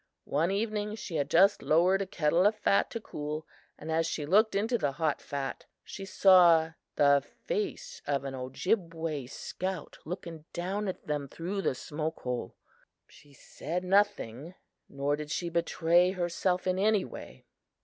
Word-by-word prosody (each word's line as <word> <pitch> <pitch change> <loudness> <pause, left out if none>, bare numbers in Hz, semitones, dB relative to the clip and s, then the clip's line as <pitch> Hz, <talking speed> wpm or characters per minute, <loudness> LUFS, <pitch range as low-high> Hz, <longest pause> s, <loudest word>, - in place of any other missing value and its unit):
"One 160 +5 +1
evening, 210 +1 -1
she 180 -6 -5
had 140 -1 -1
just 195 +6 +5
lowered 180 +5 +3
a 195 - -2
kettle 170 +2 +3
of 215 - +1
fat 200 -1 +2
to 230 - -4
cool, 150 -6 -5 0.3
and 160 +2 -6
as 165 +1 +1
she 150 -2 -3
looked 205 +6 +4
into 225 +4 +1
the 145 -5 0
hot 155 -1 -1
fat 140 -1 -5 0.2
she 195 - -8
saw 175 -4 +6 0.2
the 140 -1 +5 0.2
face - - -3
of 140 -1 0
an 135 -1 -5
Ojibway 160 - -2
scout 185 +5 -5
looking 165 -2 -7
down 195 +4 -2
at 185 - -5
them 145 -2 -2
through 180 +8 -4
the 135 - 0
smoke 155 +4 -4
hole. 125 -1 -4 0.5
She 145 - -19
said 165 +5 -5
nothing, 180 - +1 0.3
nor 140 +1 0
did 150 0 -7
she 170 +3 -2
betray 170 +1 +3
herself 180 0 -1
in 185 0 +1
any 210 -1 +3
way. - - -11
170 Hz, 160 wpm, -30 LUFS, 150-195 Hz, 0.5 s, saw